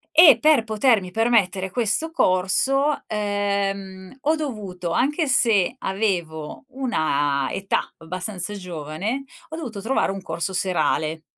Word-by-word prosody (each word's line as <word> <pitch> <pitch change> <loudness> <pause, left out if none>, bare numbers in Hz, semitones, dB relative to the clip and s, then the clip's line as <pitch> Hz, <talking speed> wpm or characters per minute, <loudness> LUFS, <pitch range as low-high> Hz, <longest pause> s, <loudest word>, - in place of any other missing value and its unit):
E 310 -7 +9
per 300 -3 +4
potermi 220 -3 +2
permettere 195 -3 +1
questo 245 - +1
corso, 270 - +2
ehm, 200 -1 -2
ho 310 +3 +2
dovuto 200 - -5
anche 295 - +1
se 230 -6 +3
avevo 175 - -3
una 145 - 0
età 195 0 -2
abbastanza 185 +4 -5
giovane, 180 - -4 0.3
ho 320 - -6
dovuto 235 -11 -6
trovare 230 -3 0
un 195 - -6
corso 190 +1 -3
serale. 160 -3 0
200 Hz, 115 wpm, -23 LUFS, 180-250 Hz, 0.3 s, E